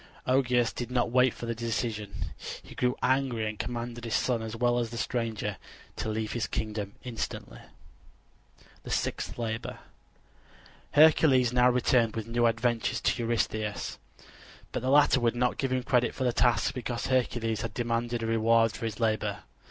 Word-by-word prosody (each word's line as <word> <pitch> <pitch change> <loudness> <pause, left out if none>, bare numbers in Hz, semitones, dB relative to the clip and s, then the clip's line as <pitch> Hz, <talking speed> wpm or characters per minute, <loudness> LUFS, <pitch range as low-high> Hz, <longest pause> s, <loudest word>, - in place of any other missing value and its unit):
Augeas 125 -2 +2
did 120 - -5
not 125 -2 0
wait 125 0 +4
for 120 - -8
the 115 - -1
decision; 110 -2 -3 0.5
he - - -12
grew 125 0 0
angry 125 -3 +1
and 110 -1 -5
commanded 120 -1 -4
his 115 -1 -1
son 120 -3 +1
as 110 0 -5
well 120 +1 +2
as 120 -1 -1
the 120 - -7
stranger 110 -4 -2 0.4
to - - -3
leave 110 0 -2
his 120 - -1
kingdom 105 -2 -3
instantly. 125 -3 -5 1.2
THE - - -10
SIXTH - - -2
LABOR 115 -1 -3 1.2
Hercules 145 -5 +5
now 125 0 +5
returned 120 -2 +2
with 110 -2 -3
new 120 +1 +2
adventures 115 0 0
to - - +1
Eurystheus; 110 -2 -2 0.7
but - - -3
the 130 - -1
latter 145 -1 +5
would 120 -1 +1
not 125 0 0
give 135 -2 0
him 130 -1 0
credit 125 -1 +1
for 130 - -2
the 125 -2 +1
task 120 0 +2
because 120 -2 -3
Hercules 120 -3 0
had 115 - -5
demanded 120 0 -1
a - - -1
reward 115 0 +3
for 115 - -6
his 110 -1 -4
labor. 110 -3 0
120 Hz, 165 wpm, -29 LUFS, 115-125 Hz, 1.2 s, Hercules